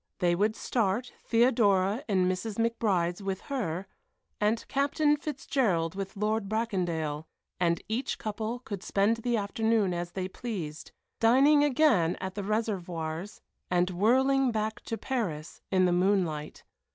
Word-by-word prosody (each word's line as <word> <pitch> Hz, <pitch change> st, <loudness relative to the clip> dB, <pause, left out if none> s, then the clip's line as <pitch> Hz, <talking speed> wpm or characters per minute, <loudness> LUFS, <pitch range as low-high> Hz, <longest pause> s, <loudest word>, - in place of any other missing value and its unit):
They 175 Hz, -1 st, +2 dB
would 210 Hz, +5 st, +1 dB
start, 230 Hz, +1 st, -1 dB
Theodora 225 Hz, -2 st, +3 dB
in 185 Hz, -4 st, +2 dB
Mrs. 185 Hz, +4 st, -2 dB
McBride's 205 Hz, -6 st, 0 dB
with 195 Hz, -1 st, -3 dB
her, 200 Hz, -, -3 dB, 0.5 s
and 215 Hz, +2 st, +1 dB
Captain 295 Hz, +2 st, +2 dB
Fitzgerald 255 Hz, -, -1 dB
with 195 Hz, +1 st, -6 dB
Lord 210 Hz, 0 st, 0 dB
Bracondale, 175 Hz, -9 st, -2 dB, 0.3 s
and 170 Hz, -2 st, +1 dB
each 225 Hz, +5 st, -2 dB
couple 220 Hz, +2 st, -3 dB
could 200 Hz, -7 st, -6 dB
spend 205 Hz, +4 st, +1 dB
the 235 Hz, +1 st, 0 dB
afternoon 215 Hz, -1 st, +1 dB
as 175 Hz, 0 st, -4 dB
they 185 Hz, -1 st, -2 dB
pleased, 185 Hz, -8 st, -6 dB, 0.3 s
dining 275 Hz, +6 st, +5 dB
again 250 Hz, -, +3 dB
at 190 Hz, 0 st, -4 dB
the 205 Hz, -, -4 dB
Réservoirs 185 Hz, -4 st, -3 dB, 0.3 s
and 180 Hz, +1 st, +2 dB
whirling 260 Hz, +7 st, +3 dB
back 220 Hz, +1 st, -2 dB
to 225 Hz, -, -3 dB
Paris 180 Hz, -, -3 dB
in 185 Hz, -1 st, +3 dB
the 180 Hz, -, +3 dB
moonlight. 175 Hz, -5 st, 0 dB
205 Hz, 135 wpm, -29 LUFS, 180-230 Hz, 0.5 s, dining